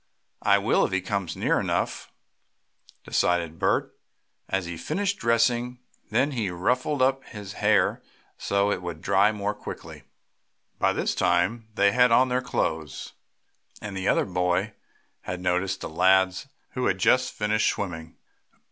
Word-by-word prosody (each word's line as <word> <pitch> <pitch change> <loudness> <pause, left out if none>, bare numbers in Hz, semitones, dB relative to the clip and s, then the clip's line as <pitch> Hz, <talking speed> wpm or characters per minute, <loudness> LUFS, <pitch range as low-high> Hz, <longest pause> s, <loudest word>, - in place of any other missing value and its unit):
"I - - +4
will, - - +2
if - - 0
he 95 - +1
comes 95 -2 -3
near - - +1
enough," - - -2 0.9
decided 85 -2 0
Bert, - - 0 0.5
as 95 -2 -1
he 85 0 -5
finished 195 - -2
dressing. 120 +1 +1 0.3
Then 130 +7 +1
he 115 -7 -2
"ruffled" 125 +10 0
up 135 +1 +1
his 105 -3 -9
hair, - - +2 0.3
so 100 +1 0
it 90 - -2
would 85 -3 -7
dry 100 +4 +4
more 105 -1 -2
quickly. 105 - -9 0.8
By - - +3
this - - -1
time 115 +1 +1
they 100 0 +4
had 125 +1 +4
on 130 +2 +5
their 125 +1 +1
clothes, 80 - -3 0.7
and 105 -2 -7
the 95 0 -3
other - - +3
boy 90 +3 0 0.5
had 90 - -6
noticed 90 +1 -1
the - - -4
lads 95 - +2 0.2
who 125 - -1
had 95 - +1
just 130 +6 +3
finished 105 0 +1
swimming. 80 -4 -5
100 Hz, 150 wpm, -26 LUFS, 90-120 Hz, 0.9 s, on